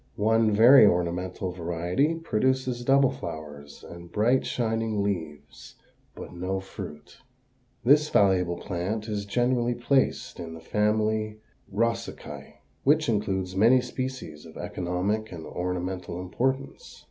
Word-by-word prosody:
One 110 Hz, +1 st, +3 dB
very 115 Hz, +5 st, +8 dB
ornamental 90 Hz, +1 st, -1 dB
variety 90 Hz, -, -1 dB
produces 130 Hz, -4 st, 0 dB
double 135 Hz, +1 st, +4 dB
flowers 75 Hz, -3 st, -8 dB
and 85 Hz, 0 st, -11 dB
bright, 115 Hz, +7 st, +2 dB
shining 115 Hz, -3 st, -1 dB
leaves, 75 Hz, -8 st, -5 dB, 0.4 s
but -, -, -9 dB
no 90 Hz, +2 st, -2 dB
fruit. 75 Hz, -6 st, -10 dB, 0.7 s
This 150 Hz, +4 st, +5 dB
valuable 90 Hz, -3 st, +3 dB
plant 100 Hz, +5 st, -3 dB
is 105 Hz, -2 st, -3 dB
generally 120 Hz, +1 st, +1 dB
placed 130 Hz, +3 st, 0 dB
in 80 Hz, -2 st, -6 dB
the -, -, -9 dB
family 110 Hz, +3 st, 0 dB, 0.3 s
Rosaceæ, 115 Hz, +3 st, -3 dB, 0.3 s
which 155 Hz, +1 st, +3 dB
includes 95 Hz, -4 st, -1 dB
many 115 Hz, +6 st, +5 dB
species 125 Hz, -, -5 dB
of 80 Hz, -, -13 dB
economic 95 Hz, +5 st, -2 dB
and 80 Hz, -3 st, -8 dB
ornamental 90 Hz, 0 st, -4 dB
importance. 130 Hz, -, -3 dB
105 Hz, 115 wpm, -26 LUFS, 90-120 Hz, 0.7 s, very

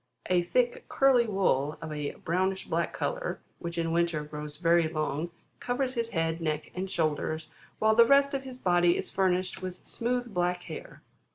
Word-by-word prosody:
A 180 Hz, -1 st, +5 dB
thick, 240 Hz, +8 st, 0 dB
curly 260 Hz, -4 st, +4 dB
wool 155 Hz, -8 st, +1 dB
of 155 Hz, -, -6 dB
a 150 Hz, -1 st, -3 dB
brownish 190 Hz, +3 st, -1 dB
black -, -, 0 dB
colour, -, -, -2 dB, 0.2 s
which 170 Hz, 0 st, -5 dB
in 165 Hz, -1 st, 0 dB
winter, 170 Hz, -2 st, +1 dB
grows 150 Hz, 0 st, -7 dB
very 170 Hz, 0 st, +4 dB
long, 155 Hz, +1 st, -2 dB, 0.3 s
covers 255 Hz, +1 st, -1 dB
his 230 Hz, -2 st, -1 dB
head, 165 Hz, -3 st, -1 dB
neck, 155 Hz, -1 st, -2 dB
and 190 Hz, +1 st, -3 dB
shoulders, 155 Hz, -1 st, -1 dB, 0.3 s
while 220 Hz, 0 st, +4 dB
the 230 Hz, +1 st, +7 dB
rest 280 Hz, +1 st, +5 dB
of 275 Hz, -, -1 dB
his 260 Hz, -2 st, -9 dB
body 175 Hz, -5 st, +3 dB
is -, -, -4 dB
furnished 185 Hz, 0 st, +1 dB
with 185 Hz, -1 st, -7 dB
smooth 245 Hz, -1 st, -2 dB
black 180 Hz, 0 st, 0 dB
hair. 160 Hz, -3 st, -9 dB
180 Hz, 175 wpm, -29 LUFS, 160-230 Hz, 0.3 s, the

